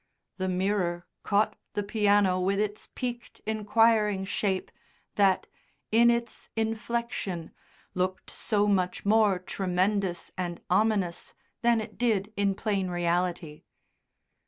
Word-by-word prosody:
The 185 -1 -1
mirror 180 -2 0 0.2
caught 205 +1 +1 0.2
the 205 - -1
piano 205 -3 +3
with 195 +2 +1
its 210 0 -3
peaked 240 -1 -5
inquiring 215 -2 +2
shape, 190 -1 -1 0.4
that, 195 -2 +3 0.5
in 235 +2 +6
its 235 0 -2
inflection, 225 -5 -2 0.4
looked 185 +1 -2
so 205 -2 0
much 185 -3 0
more 210 -2 +4
tremendous 185 0 -1
and 175 -2 -3
ominous 195 -3 +1 0.3
than 235 -1 +4
it 215 -1 -7
did 215 -4 +1
in 200 -1 +1
plain 195 -3 -1
reality. 175 -2 -1
200 Hz, 110 wpm, -28 LUFS, 185-220 Hz, 0.5 s, in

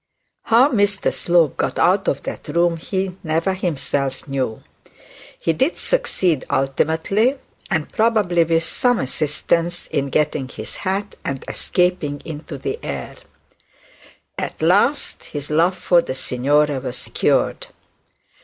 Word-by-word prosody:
How 240 +5 +5
Mr 205 -3 +1
Slope 170 -5 +2
got - - -1
out - - +3
of - - 0
that - - -6
room 170 +2 +2
he 190 +2 -3
never 165 +4 0
himself 145 -7 -2
knew. 130 -5 -2 0.8
He 165 - +1
did 265 - +1
succeed 180 - 0
ultimately, 160 - +1 0.3
and 160 -6 0
probably 210 -7 +2
with 165 0 +1
some 245 +7 +2
assistance, 165 +5 0
in 140 0 -2
getting 150 -1 0
him - - -14
his - - -6
had 200 +1 -2
and 135 -2 -4
escaping 180 -6 0
into 155 -1 -7
the - - -4
air. 70 -3 -5 1.3
At - - -4
last 200 - +2
his 145 0 -6
love 170 +4 +3
for 175 -1 +4
the 130 - -5
signora 140 +3 +1
was 125 -1 -6
cured. - - +1
165 Hz, 130 wpm, -21 LUFS, 145-190 Hz, 1.3 s, How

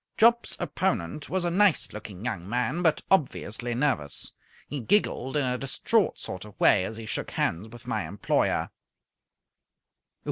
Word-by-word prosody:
Jopp's 235 +1 +4
opponent 145 - -1
was 185 -1 0
a 175 - +1
nice 195 -1 +3
looking 105 -1 -8
young 90 -5 -3
man, 125 +8 0
but 160 -3 +2
obviously 120 - +1
nervous. 125 - 0 0.4
He 145 - -4
giggled 135 - +1
in 145 - +2
a 125 0 -1
distraught 205 +10 +1
sort 95 -1 -6
of 105 -1 -14
way 95 - +5
as 110 - -5
he 115 - -7
shook - - -3
hands 90 +7 -1
with 120 +1 -13
my - - -2
employer. - - 0
125 Hz, 150 wpm, -27 LUFS, 105-175 Hz, 0.4 s, way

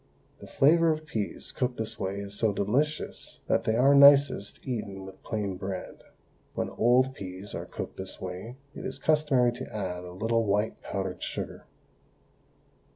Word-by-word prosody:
The - - -11
flavour 165 +4 +4
of 155 0 -3
peas 110 -9 -4
cooked 125 -1 -2
this 110 -1 -4
way 100 +1 -2
is 100 0 -7
so 110 +1 +1
delicious 135 +11 -1
that - - +1
they 110 - +2
are 135 +4 +5
nicest 140 -7 +6
eaten 100 -6 -4
with 95 0 -12
plain 100 -4 -3
bread. 95 -1 -6 0.5
When - - -2
old 125 +3 +3
peas 95 -3 -7
are - - -5
cooked - - -6
this 95 0 -6
way 95 +6 -6 0.2
it - - -8
is - - -4
customary 150 -6 +3
to 120 - -8
add 90 -4 -4
a 90 - -8
little 115 +4 +1
white 105 +1 0
powdered 95 -2 -4
sugar. - - -5
110 Hz, 160 wpm, -28 LUFS, 95-130 Hz, 0.5 s, nicest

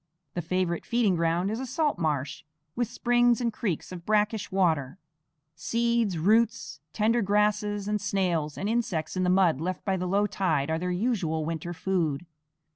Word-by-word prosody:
The 175 - -2
favorite 175 0 -1
feeding 230 -6 +2
ground 170 +3 +1
is 220 - -3
a 265 - -3
salt 295 - 0
marsh, 145 -4 -2 0.3
with 240 -1 0
springs 240 0 +2
and 235 -2 -1
creeks 200 -11 -3
of 175 -2 -7
brackish 210 +1 0
water. 165 -6 +1 0.6
Seeds, 230 +2 0
roots, 220 +1 +1
tender 225 +2 +2
grasses, 205 0 +1
and 210 -1 -1
snails 175 -7 -1
and 195 - -2
insects 220 -9 -1
in 185 - 0
the 180 - +2
mud 180 -6 +3
left 185 +2 -3
by 190 -2 +1
the 180 0 -2
low 200 +3 +2
tide 160 -8 0
are 160 - 0
their 180 +1 -2
usual 180 -6 -1
winter 165 +1 -4
food. 170 -3 -1
190 Hz, 170 wpm, -27 LUFS, 165-220 Hz, 0.6 s, mud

